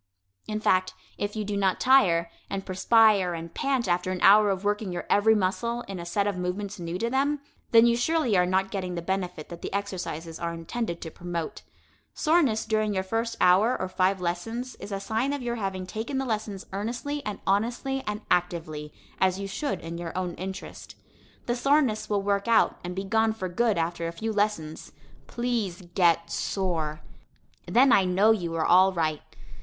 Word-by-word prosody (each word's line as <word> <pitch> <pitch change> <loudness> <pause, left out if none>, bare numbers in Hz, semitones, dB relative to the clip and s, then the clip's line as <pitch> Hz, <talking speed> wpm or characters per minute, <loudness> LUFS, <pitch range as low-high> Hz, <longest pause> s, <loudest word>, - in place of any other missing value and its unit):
In 215 0 -2
fact, 185 -3 +1 0.2
if 205 +1 -2
you 215 -1 -2
do 205 0 -3
not 195 -2 +1
tire, 175 -11 +4 0.2
and 195 -1 -4
perspire 195 -1 +4
and 165 0 -7
pant 265 -5 0
after 180 +1 0
an 185 - -3
hour 210 +1 +7
of 195 0 -1
working 205 -1 -1
your 175 - -4
every 220 +2 +5
muscle 235 +5 -1
in 195 -5 -7
a 170 - -6
set 200 +3 0
of 205 -2 -1
movements 190 +2 -3
new 170 0 -4
to 230 - -1
them, 275 +4 +1 0.3
then 230 0 +7
you 235 0 +4
surely 250 -2 +1
are 180 -1 +4
not 190 +1 +1
getting 185 -3 -3
the 170 - -4
benefit 180 -4 -3
that 170 - -9
the - - -5
exercises 175 -5 -4
are 170 0 -3
intended 170 +2 -4
to 160 - -6
promote. 170 -1 -5 0.5
Soreness 305 -9 +2
during 215 -2 0
your 190 - 0
first 230 +3 -2
four 195 +7 +4
or 185 - -2
five 185 +1 +1
lessons 225 +9 -3
is 200 - -9
a 195 - -2
sign 225 +7 -1
of 285 -3 -4
your 240 0 -2
having 190 -3 -3
taken 225 +8 -4
the 270 - -1
lessons 215 -4 -3
earnestly 240 +8 -3
and 210 -4 -4
honestly 240 +7 0
and 210 +1 -3
actively, 160 -4 -1 0.3
as 190 0 +2
you 200 - -4
should 280 +9 -3
in 165 +1 -6
your 175 +1 -5
own 180 -2 -2
interest. 190 +2 -8 0.5
The 240 - 0
soreness 265 -3 +2
will 205 -2 0
work 200 +1 0
out 230 -1 +3
and 180 0 -5
be 195 - -3
gone 220 +2 +2
for 190 -4 -4
good 220 +3 +1
after 170 0 -1
a - - -3
few 220 +6 -4
lessons. 205 -7 -2 0.3
Please 230 -7 -2
get 170 -2 +3
sore! 160 -6 -2 0.7
Then 255 +2 +5
I 195 - +6
know 190 +4 +4
you 175 -6 -1
are 160 - 0
all 185 +2 +6
right. 160 -4 -1
195 Hz, 190 wpm, -27 LUFS, 180-225 Hz, 0.7 s, hour